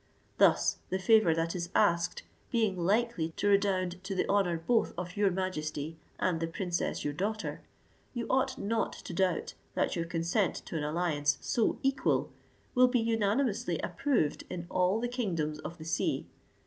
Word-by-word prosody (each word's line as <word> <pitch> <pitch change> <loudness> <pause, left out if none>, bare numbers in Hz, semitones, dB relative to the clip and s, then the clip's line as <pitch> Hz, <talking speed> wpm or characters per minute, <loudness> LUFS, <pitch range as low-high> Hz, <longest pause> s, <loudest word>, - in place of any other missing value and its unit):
Thus - - +4
the 190 - 0
favour 190 -3 +5
that 165 +1 -1
is 175 -1 -3
asked 170 -4 +2 0.3
being 220 -6 +1
likely 185 -2 +1
to 205 - +2
redound 185 -3 +1
to 195 0 -4
the 185 - 0
honour 195 -4 +2
both 225 +8 +1
of 180 0 -5
your 205 -1 +3
majesty 160 -4 -3 0.2
and 175 -3 0
the 165 - -1
princess 175 +1 -2
your 145 - -1
daughter, 210 +7 -3 0.5
you 240 -2 -3
ought 265 0 +1
not 225 +2 -1
to - - -8
doubt 180 -1 0 0.2
that - - +1
your 170 -1 -1
consent 170 +4 0
to - - -7
an 155 - -1
alliance 150 -2 +1
so 230 - +1
equal 270 0 +1 0.4
will 255 0 +6
be 250 0 +2
unanimously 225 +1 +1
approved 240 - 0
in 175 -1 -5
all 185 +3 +2
the 245 - -1
kingdoms 170 -12 -2
of 170 +2 -7
the 160 - -9
sea. 165 - 0
185 Hz, 165 wpm, -31 LUFS, 165-220 Hz, 0.5 s, will